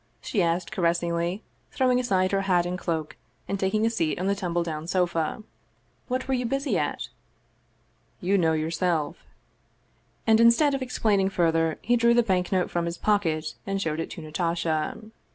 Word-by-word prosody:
she 205 - -1
asked 170 +1 0
caressingly, 170 +2 0 0.3
throwing 255 -1 +2
aside 190 -6 +1
her 195 -1 +1
hat 180 -3 +2
and 180 +1 -3
cloak, 160 -4 -3 0.3
and 195 - -2
taking 215 +3 +1
a - - +3
seat 165 -9 -1
on 185 - -2
the 200 - +2
tumble 175 -3 -1
down 160 -1 -5
sofa. 175 +1 0 0.6
"What 255 +1 -2
were 265 - 0
you 250 -1 0
busy 275 +3 -1
at?" - - -2 0.6
" - - -40
You 200 - +4
know, 165 -4 +3
yourself." 160 0 -1 1.1
And 220 -1 +5
instead 235 +6 +5
of 270 - -1
explaining 210 -6 +1
further, 165 -3 +1
he 240 +2 +3
drew 235 0 +4
the 240 - +5
bank 185 -4 0
note 185 -2 +1
from 175 -1 0
his 170 0 -4
pocket 165 -7 0
and 195 0 -1
showed 160 -4 -2
it 165 - -3
to - - -8
Natasha. 160 0 -1
180 Hz, 175 wpm, -26 LUFS, 165-215 Hz, 1.1 s, And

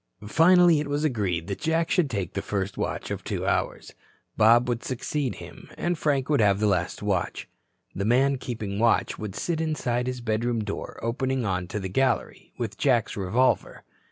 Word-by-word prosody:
Finally 170 - +5
it 150 - -3
was 145 +1 -1
agreed 100 - 0
that 100 +1 -5
Jack 165 +1 0
should 175 -7 +2
take 100 -7 -3
the 100 - -2
first 100 -1 -3
watch - - -3
of - - -4
two - - -3
hours, - - -1 0.4
Bob 115 +3 +5
would 120 -1 -2
succeed 130 -1 -2
him - - -11
and 175 0 0
Frank 140 -4 0
would 150 -3 +2
have 100 -2 +3
the 105 - +1
last 90 -1 0
watch. 95 -4 -1 0.5
The 100 - -3
man 130 +5 +3
keeping 110 -6 -4
watch 115 0 +2
would 105 -3 -5
sit 165 -2 -2
inside 130 -6 -1
his 125 -1 -3
bedroom 115 0 -1
door 100 -1 -6
opening 130 +2 -1
on 90 -3 -1
to 105 - -4
the 95 - -4
gallery, 130 +8 -1
with 115 -4 -4
Jack's 125 -5 +2
revolver. 105 +7 0
120 Hz, 185 wpm, -26 LUFS, 100-140 Hz, 0.5 s, Finally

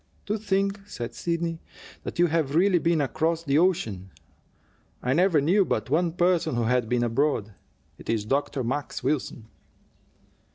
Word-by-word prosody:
"To 210 - -1
think," 200 -1 0
said 120 -10 -6
Sidney, 170 -1 -2 0.4
"that - - -7
you 175 - +5
have 155 -4 0
really 180 +1 +4
been 165 -1 +2
across 160 +4 0
the 145 -1 +2
ocean! 115 - 0 0.9
I 125 - +1
never 175 0 +4
knew 180 +8 +3
but 140 - -2
one 165 +2 +2
person 175 -5 +1
who 120 - 0
had 120 -1 +1
been 125 -1 +1
abroad. 120 -3 0 0.5
It - - -11
is 110 -2 0
Dr. 135 +2 -1
Max 135 +2 -3
Wilson." 130 -4 -2
155 Hz, 155 wpm, -26 LUFS, 125-175 Hz, 0.9 s, you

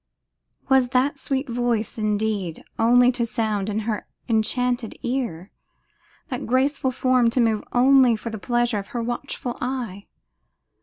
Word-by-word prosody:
Was 265 -2 +4
that 275 +2 +1
sweet 270 +1 -2
voice, 235 -2 -1
indeed, 210 -5 -1 0.2
only 245 +2 +5
to 245 -1 -2
sound 215 -3 -1
in 210 +1 -1
her 215 -1 -3 0.2
enchanted 240 +1 0
ear, 235 -8 -3 0.8
that 250 - -4
graceful 260 +2 +1
form 255 -1 +2
to 240 - -1
move 225 -3 +2
only 255 -1 +5
for 225 +1 -6
the 220 - -6
pleasure 240 +1 0
of 195 - -8
her 235 - -1
watchful 240 +1 -4
eye? 240 -6 -4
240 Hz, 140 wpm, -23 LUFS, 220-255 Hz, 0.8 s, only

